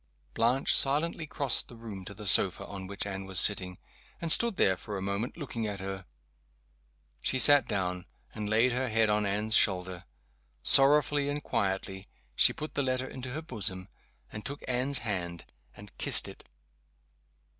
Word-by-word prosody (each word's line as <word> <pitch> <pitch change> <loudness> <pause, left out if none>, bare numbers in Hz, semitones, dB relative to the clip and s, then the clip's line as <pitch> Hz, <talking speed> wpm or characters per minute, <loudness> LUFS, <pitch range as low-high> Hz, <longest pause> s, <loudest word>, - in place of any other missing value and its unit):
_" - - -34
Blanche 120 +4 +2
silently 155 +3 +2
crossed 140 -3 -1
the 120 - -13
room 110 -5 -9
to 100 - -9
the 105 +1 -10
sofa 95 -2 +4
on 95 -2 -8
which 100 +1 -4
Anne 95 -1 -6
was 95 -1 +1
sitting, 90 -3 +1 0.4
and 165 -1 -2
stood 235 +2 +4
there 95 - +2
for 100 +3 -7
a - - -4
moment, 100 - -4
looking 120 -8 -5
at 100 -1 -5
her. 95 -1 -7 1.1
She 130 - 0
sat 145 0 +7
down, 90 -2 -3 0.3
and 105 -1 -5
laid 115 +4 +3
her 130 +2 -1
head 110 -1 +2
on 105 -1 +1
Anne's 105 +2 -2
shoulder. 90 -4 +1 0.6
Sorrowfully 145 +1 +4
and 145 +1 -3
quietly, 95 -1 -3 0.3
she - - +5
put 155 - -8
the - - -1
letter 130 -1 -2
into 130 0 -8
her 155 +3 -5
bosom 95 - -3 0.4
and 110 - -8
took 140 +5 -7
Anne's 130 +2 0
hand, 85 -5 -4 0.3
and - - -14
kissed - - +1
it. - - -13
110 Hz, 170 wpm, -29 LUFS, 95-135 Hz, 1.1 s, sat